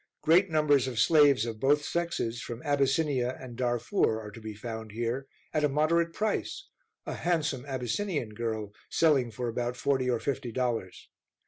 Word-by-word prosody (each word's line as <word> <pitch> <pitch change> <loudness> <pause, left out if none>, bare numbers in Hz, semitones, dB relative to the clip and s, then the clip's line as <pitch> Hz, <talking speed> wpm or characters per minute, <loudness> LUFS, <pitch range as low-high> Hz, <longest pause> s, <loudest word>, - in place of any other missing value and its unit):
Great 180 +5 +5
numbers 145 -4 +3
of 125 -3 -5
slaves 140 -2 +5
of 115 -2 -5
both 145 +3 +3
sexes, 170 -9 -2
from 120 +3 -7
Abyssinia 140 -3 +1
and 125 -2 -9
Darfour, 120 - +1
are 105 -1 -8
to 115 - -11
be 110 -1 -7
found 110 0 -7
here, 120 +4 -2 0.3
at 155 - +1
a 150 - +4
moderate 165 +4 +2
price, 220 - -2 0.4
a - - -4
handsome 150 -7 -1
Abyssinian 135 - -2
girl 110 -1 -4 0.2
selling 145 -7 +3
for 120 +2 -4
about 120 +1 -2
forty 130 -2 +1
or 120 -2 +1
fifty 130 -3 -3
dollars. 115 -6 -2
130 Hz, 160 wpm, -29 LUFS, 115-150 Hz, 0.4 s, Great